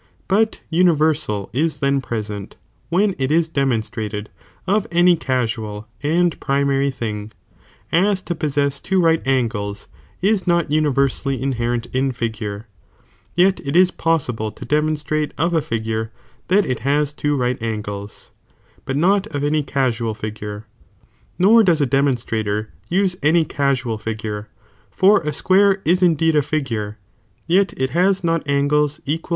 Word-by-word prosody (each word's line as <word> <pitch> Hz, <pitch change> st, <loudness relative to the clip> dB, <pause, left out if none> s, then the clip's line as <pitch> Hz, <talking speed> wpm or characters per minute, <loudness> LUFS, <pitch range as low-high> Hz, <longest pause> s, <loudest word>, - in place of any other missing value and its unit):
But 220 Hz, +3 st, +1 dB
universal 155 Hz, -, +2 dB
ia 155 Hz, +6 st, +2 dB
then 140 Hz, -1 st, +1 dB
present, 105 Hz, -4 st, -5 dB, 0.3 s
when 195 Hz, +4 st, +2 dB
it 135 Hz, +1 st, 0 dB
is 165 Hz, +1 st, +3 dB
demonstrated 110 Hz, -7 st, -2 dB, 0.3 s
of 205 Hz, +2 st, +1 dB
any 175 Hz, +1 st, +5 dB
casual 115 Hz, -7 st, -2 dB
and 170 Hz, +3 st, +1 dB
pri 140 Hz, +1 st, 0 dB
mftry 140 Hz, 0 st, +1 dB
thing, 110 Hz, -4 st, -5 dB, 0.6 s
aa 195 Hz, +5 st, +4 dB
to 185 Hz, -2 st, -4 dB
possess 140 Hz, -3 st, -1 dB
two 190 Hz, -, 0 dB
right 165 Hz, -2 st, +3 dB
angles 110 Hz, -6 st, -1 dB, 0.3 s
is 195 Hz, -1 st, +1 dB
not 170 Hz, -4 st, +2 dB
universally 140 Hz, -3 st, +1 dB
inherent 120 Hz, -3 st, -1 dB
in 135 Hz, +1 st, +1 dB
figure, 110 Hz, -3 st, -4 dB, 0.7 s
yet 185 Hz, +2 st, +3 dB
it 140 Hz, +2 st, -3 dB
is 185 Hz, +1 st, +6 dB
possible 125 Hz, -10 st, -1 dB
to -, -, -10 dB
demonstrate 150 Hz, 0 st, 0 dB
of 170 Hz, +3 st, +1 dB
a 165 Hz, -, +2 dB
figure 110 Hz, -2 st, -3 dB, 0.4 s
that 200 Hz, +2 st, +3 dB
it 125 Hz, -3 st, -3 dB
baa 145 Hz, +2 st, +2 dB
two 145 Hz, -1 st, 0 dB
right 125 Hz, -1 st, -1 dB
angles, 105 Hz, -2 st, -5 dB, 0.5 s
but 135 Hz, -, -2 dB
not 195 Hz, +5 st, +2 dB
of 145 Hz, -7 st, -4 dB
any 150 Hz, +1 st, +1 dB
casual 120 Hz, -6 st, -1 dB
figure, 105 Hz, 0 st, -6 dB, 0.7 s
nor 215 Hz, +5 st, +6 dB
does 170 Hz, -5 st, +3 dB
a 145 Hz, -, +3 dB
demonstrator 115 Hz, -6 st, 0 dB, 0.2 s
use 185 Hz, 0 st, +1 dB
any 160 Hz, +2 st, +3 dB
casuni 130 Hz, -6 st, -1 dB
figure, 105 Hz, -1 st, -5 dB, 0.4 s
for 190 Hz, -, +4 dB
a 150 Hz, -1 st, -2 dB
square 195 Hz, +5 st, +3 dB
is 180 Hz, +3 st, +3 dB
in 175 Hz, -3 st, +4 dB
deed 160 Hz, +1 st, +2 dB
a 150 Hz, -, +5 dB
figure, 120 Hz, -8 st, -3 dB, 0.5 s
yet 190 Hz, +4 st, +3 dB
it 130 Hz, 0 st, -1 dB
baa 185 Hz, +4 st, +4 dB
not 165 Hz, -1 st, +1 dB
angles 145 Hz, +1 st, +1 dB
equal 150 Hz, +2 st, 0 dB
to 165 Hz, -, -8 dB
two -, -, -17 dB
right. -, -, -21 dB
140 Hz, 150 wpm, -20 LUFS, 115-165 Hz, 0.7 s, is